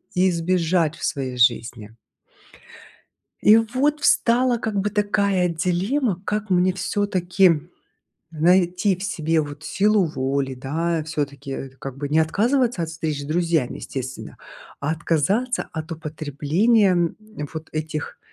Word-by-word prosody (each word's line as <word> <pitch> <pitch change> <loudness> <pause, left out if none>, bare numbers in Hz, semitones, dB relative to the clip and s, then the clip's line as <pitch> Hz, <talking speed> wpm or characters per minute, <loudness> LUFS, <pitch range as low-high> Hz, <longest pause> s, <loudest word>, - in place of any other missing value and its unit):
избежать 175 -2 +1
в - - -8
своей 130 -4 -2
жизни. 115 -2 +1 1.5
И 215 +2 +7
вот 260 +7 +1
встала 245 -1 +3
как 215 -2 -2
бы 205 +2 -1
такая 200 -3 +1
дилемма: 180 - -1
как 210 0 -3
мне 185 0 +3
всё-таки 180 -3 +1 0.6
найти 180 +4 +2
в 185 - -9
себе 165 -5 0
вот 145 0 -7
силу 210 0 +2
воли, 135 -3 -2
да, 160 +6 -2
всё-таки 140 -3 -4
это 135 0 -7
как 135 -1 -7
бы 145 +1 -4
не 150 +2 +2
отказываться 230 - +1
от 160 - -3
встреч 160 -3 -3
с - - -7
друзьями, 160 -3 0
естественно, 130 -1 -7 0.4
а 145 - -1
отказаться 170 - 0
от 160 0 -6
употребления 165 - +1 0.4
вот 160 0 -7
этих 155 0 -4
170 Hz, 125 wpm, -22 LUFS, 150-200 Hz, 1.5 s, И